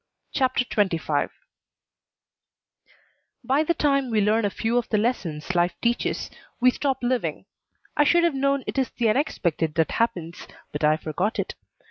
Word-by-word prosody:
CHAPTER 260 -2 +1
XXV 165 -10 0 2.1
By 270 +3 +2
the 340 +2 +1
time 275 -3 +1
we 220 -2 +2
learn 210 +2 +2
a - - +2
few 225 +4 0
of 240 - -6
the 215 - +2
lessons 185 -8 -1
life 175 0 +2
teaches 235 0 -1 0.3
we 255 +1 +5
stop 270 0 -1
living. 245 0 -1 0.5
I 295 - +5
should 340 +4 +4
have 340 -3 +3
known 275 0 +1
it - - -2
is 260 - 0
the 235 -2 0
unexpected 170 - 0
that 160 -1 +2
happens, 175 -7 -2 0.2
but 150 - -4
I 155 +1 +4
forgot 175 +7 -2
it. - - -2
230 Hz, 155 wpm, -25 LUFS, 175-265 Hz, 2.1 s, we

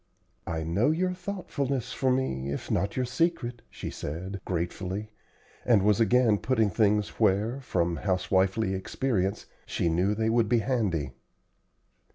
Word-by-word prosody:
"I 80 -1 -2
know 95 - +2
your 180 +4 +1
thoughtfulness 160 - -3
for 135 - +1
me, 70 - 0
if 70 - -4
not 100 +3 0
your 130 - +1
secret," 125 -3 -1
she - - -6
said, 95 +6 -5
gratefully, 95 +4 -3 0.5
and 110 -6 +4
was 105 0 +3
again 115 -2 +4
putting 115 -5 +1
things 105 +1 +2
where, 105 +7 +2
from 85 -8 0
housewifely 95 +1 +1
experience, 95 0 -1 0.2
she 85 - 0
knew 90 +5 +1
they 110 +1 +1
would 115 -2 +2
be 120 - +4
handy. 100 - 0
105 Hz, 140 wpm, -28 LUFS, 95-125 Hz, 0.5 s, and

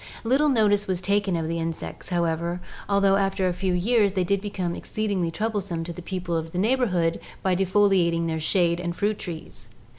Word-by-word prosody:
Little 270 +6 +3
notice 210 -5 +3
was 185 -2 0
taken 200 -1 +1
of 165 -1 -1
the 165 +1 -2
insects, 165 +3 -5
however, 170 0 0 0.3
although 200 -1 +4
after 195 -1 +1
a 180 - 0
few 185 +1 -1
years 205 +1 +2
they 190 -2 +1
did 200 +2 0
become 190 -4 -3
exceedingly 200 -3 -2
troublesome 200 -2 -2
to 170 +1 -5
the 180 - -8
people 180 -1 -3
of 165 0 -2
the - - -3
neighborhood 190 -6 +1 0.2
by 190 -1 +2
defoliating 185 -3 +3
their 160 -1 -1
shade 170 +1 +2
and 175 -1 -3
fruit 210 +2 0
trees. 160 - -8
185 Hz, 185 wpm, -25 LUFS, 170-200 Hz, 0.3 s, although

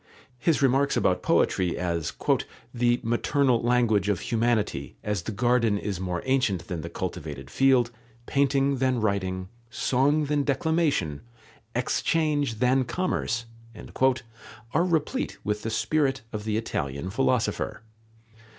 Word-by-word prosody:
His 155 0 +2
remarks 135 +1 +3
about - - +2
poetry 90 -2 +2
as 85 -4 -1 0.6
"the 120 0 +2
maternal 120 +2 +2
language 115 -5 +2
of 100 - +1
humanity, 110 - 0
as 105 -3 -1
the 100 - -5
garden 115 -1 +2
is 100 -3 -3
more 90 -2 -3
ancient 125 -9 +1
than 90 -4 -4
the - - -6
cultivated 70 -3 -6
field, 130 - +3 0.3
painting 140 0 +2
than 130 -1 +1
writing, 95 -3 -1 0.2
song 140 +6 +2
than 145 0 +1
declamation, 140 - 0 0.5
exchange 145 +1 +1
than 130 +3 +3
commerce," 120 -6 -1 1.3
are 165 - +3
replete 175 - -1
with 105 0 -1
the 115 - -3
spirit 135 +4 +1
of 105 -1 -4
the 110 -1 0
Italian 75 -6 -3
philosopher. 125 -1 0
120 Hz, 125 wpm, -26 LUFS, 100-135 Hz, 1.3 s, remarks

